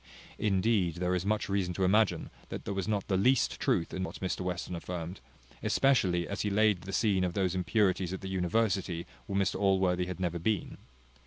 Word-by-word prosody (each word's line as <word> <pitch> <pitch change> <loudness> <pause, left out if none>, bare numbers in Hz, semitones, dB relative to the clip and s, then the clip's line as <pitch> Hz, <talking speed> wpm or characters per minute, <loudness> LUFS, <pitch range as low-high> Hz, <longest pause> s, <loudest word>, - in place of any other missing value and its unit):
Indeed, 95 -4 +2
there 90 +1 0
is 90 +1 -1
much 105 0 0
reason 95 -3 -1
to 95 - 0
imagine 105 +2 +2 0.2
that - - -6
there - - -2
was 95 0 -2
not 105 -3 -1
the 95 - +1
least 125 +6 +2
truth 85 - 0
in 95 - -3
what 95 - -5
Mr 95 0 -2
Western 90 0 -3
affirmed, 85 +1 -5 0.4
especially 95 -11 +2
as 100 - -3
he 105 - 0
laid 105 -2 +3
the 95 - -7
scene 95 -1 +2
of 90 -1 -1
those 95 -3 +1
impurities 95 -1 +1
at 95 - -5
the 95 - -6
university, 95 -1 0 0.2
where 100 0 0
Mr 95 -1 0
Allworthy 95 -2 +2
had 90 0 -5
never 85 -2 -1
been. 105 +3 -1
95 Hz, 195 wpm, -30 LUFS, 90-100 Hz, 0.4 s, laid